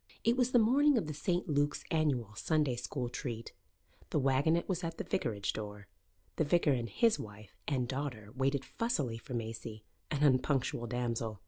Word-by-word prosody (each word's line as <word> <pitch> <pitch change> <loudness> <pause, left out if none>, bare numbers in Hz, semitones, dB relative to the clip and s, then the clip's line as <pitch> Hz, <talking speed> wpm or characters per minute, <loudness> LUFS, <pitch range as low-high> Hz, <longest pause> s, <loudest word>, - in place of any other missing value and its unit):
It 230 +1 +4
was 250 -1 +2
the 255 - +4
morning 270 +5 +5
of 215 - +1
the 155 - -4
St. 175 +6 -1
Luke's 145 -1 +1
annual 135 -9 +1
Sunday 150 +2 +1
school 125 +1 -3
treat. 120 -2 -5 0.6
The - - +1
waggonette 140 +5 +2
was 180 -2 -1
at 165 0 -3
the - - -3
vicarage 105 - -1
door. 105 -1 -6 0.5
The - - +3
vicar 155 0 +3
and 120 -3 0
his 230 -1 +3
wife 105 -1 -10
and 130 -4 0
daughter 125 -6 -4
waited 135 +1 +1
fussily 145 - -1
for 125 - -7
Maisie, 110 -1 -5 0.3
an 150 -1 0
unpunctual 130 -3 +2
damsel. 115 -3 -2
135 Hz, 175 wpm, -33 LUFS, 115-160 Hz, 0.6 s, morning